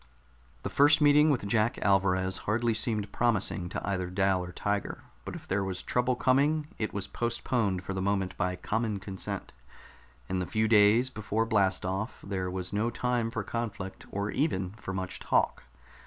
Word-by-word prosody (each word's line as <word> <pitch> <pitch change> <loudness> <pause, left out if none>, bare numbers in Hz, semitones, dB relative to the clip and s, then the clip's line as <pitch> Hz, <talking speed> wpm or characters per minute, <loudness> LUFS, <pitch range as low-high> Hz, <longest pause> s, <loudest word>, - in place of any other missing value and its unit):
The - - -2
first 145 +2 +5
meeting 150 +1 +6
with 130 -8 +1
Jack 110 +2 +1
Alvarez 95 -1 +2
hardly 115 +1 +2
seemed 110 -2 0
promising 100 -6 0
to - - -4
either 95 -2 -1
Dal 95 0 +1
or 90 - -7
Tiger, 100 +2 -2 0.2
but - - -5
if - - -10
there 100 +1 0
was 95 -1 -4
trouble 125 +1 +1
coming, 145 +5 +2
it 110 - -1
was 100 0 -3
postponed 115 -5 -1
for 95 - -4
the 95 - -2
moment 95 -2 0
by 90 -1 -1
common 110 +2 -1
consent. 95 -1 -5 0.7
In 95 - -1
the 90 - -2
few 110 0 +1
days 110 +4 +5
before 110 0 -1
blast 100 -5 +2
off 95 +5 -3
there 95 -2 -2
was 90 0 -4
no 105 +3 +1
time 120 -1 0
for 115 -2 -3
conflict, 105 -4 -5
or 100 +1 -2
even 95 - 0
for 105 -2 -7
much 95 -1 -4
talk. - - +1
100 Hz, 175 wpm, -29 LUFS, 95-115 Hz, 0.7 s, meeting